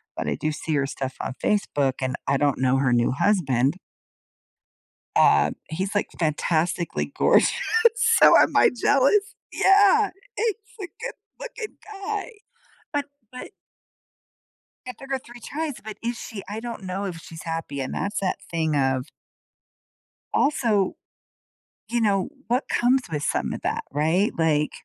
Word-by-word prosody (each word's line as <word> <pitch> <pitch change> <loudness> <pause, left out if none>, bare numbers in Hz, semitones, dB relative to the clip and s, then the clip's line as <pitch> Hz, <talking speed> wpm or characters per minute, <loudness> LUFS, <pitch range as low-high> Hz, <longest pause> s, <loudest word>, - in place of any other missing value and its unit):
but - - -4
I - - 0
do 155 - -2
see 155 +1 -3
her 140 -1 +1
stuff 135 -1 -5
on - - -4
Facebook, 145 -10 +1
and 130 +1 -1
I 140 0 +2
don't 145 -2 +1
know 130 0 +3
her 130 -2 +2
new 120 +1 +2
husband. 140 - +2 1.4
Uh, 70 0 +5 0.2
he's, 190 +5 -3
like, 205 - 0
fantastically 165 +1 0
gorgeous, - - +4 0.4
so 465 -1 +6
am - - +4
I - - +6
jealous? 285 - +3 0.2
Yeah, 405 +2 +5 0.3
he's 435 -2 -3
a - - -35
good - - -4 0.3
looking 480 -3 -7 0.3
guy. 425 +2 -3 0.6
But 285 -1 -1 0.2
but 250 - -9 1.4
it 250 -3 -7
took 270 0 -10
her 265 - 0
3 240 -1 -13
tries, 300 +4 -4
but 215 -1 -8
is 235 0 -2
she 200 -3 -7
I 215 +2 -4
don't 235 -3 -7
know 190 +2 -3
if 175 -4 -5
she's 160 -1 -10
happy, 165 -4 -4
and 130 - -3
that's 200 - -2
that 190 -2 -1
thing 160 -2 0
of 130 -2 +1 1.3
Also, 225 -9 +2 0.9
you 240 0 0
know, 200 -2 +1 0.2
what 245 +3 0
comes 250 +2 +2
with 150 -1 -2
some - - -1
of - - -6
that? - - -2
Right? 160 +8 +2
Like 150 -2 +2
195 Hz, 150 wpm, -24 LUFS, -, 1.4 s, so